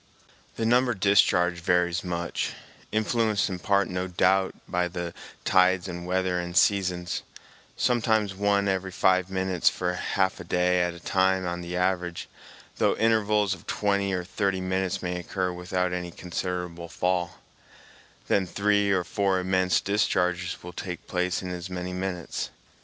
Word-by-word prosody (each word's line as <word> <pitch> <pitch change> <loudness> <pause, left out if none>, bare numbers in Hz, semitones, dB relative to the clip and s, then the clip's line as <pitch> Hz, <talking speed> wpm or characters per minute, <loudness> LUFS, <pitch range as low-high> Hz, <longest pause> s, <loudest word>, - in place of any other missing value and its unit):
The 115 - -2
number 120 +1 +3
discharged 90 -3 +3
varies 90 -1 +2
much, 85 -1 -2 0.4
influenced 110 -1 +1
in 90 -2 -4
part 100 +1 +2
no 90 0 -3
doubt 95 +1 +2
by 90 0 0
the 85 -1 -5 0.3
tides 95 0 +4
and 85 -1 -6
weather 90 -1 0
and 85 +1 -3
seasons, 90 -3 +2 0.6
sometimes 110 -4 +2
one 100 +1 +1
every 95 -1 0
five 95 0 +2
minutes 95 -2 +2
for 90 0 -2
half 95 +1 0
a - - -6
day 90 +1 +2
at 90 -1 -1
a - - -10
time 95 +1 +1
on 85 0 -3
the 85 +1 -5
average, 90 -2 -1 0.5
though - - +2
intervals 105 -2 +2
of - - -11
twenty 100 -1 0
or 90 -1 -1
thirty 95 +1 -1
minutes 95 0 -1
may 90 0 -2
occur 90 +1 -2
without 90 0 -1
any 90 -1 -3
considerable 90 -1 -4
fall, 90 -1 -1 0.9
then 95 -2 +2
three 100 +2 +2
or 95 -2 +2
four 100 0 0
immense 95 0 +2
discharges 90 -3 0
will 90 0 -8
take 90 0 -6
place 90 0 -1
in 90 - -4
as 90 +1 -5
many 90 0 -4
minutes. 90 -2 -3
90 Hz, 150 wpm, -26 LUFS, 90-100 Hz, 0.9 s, tides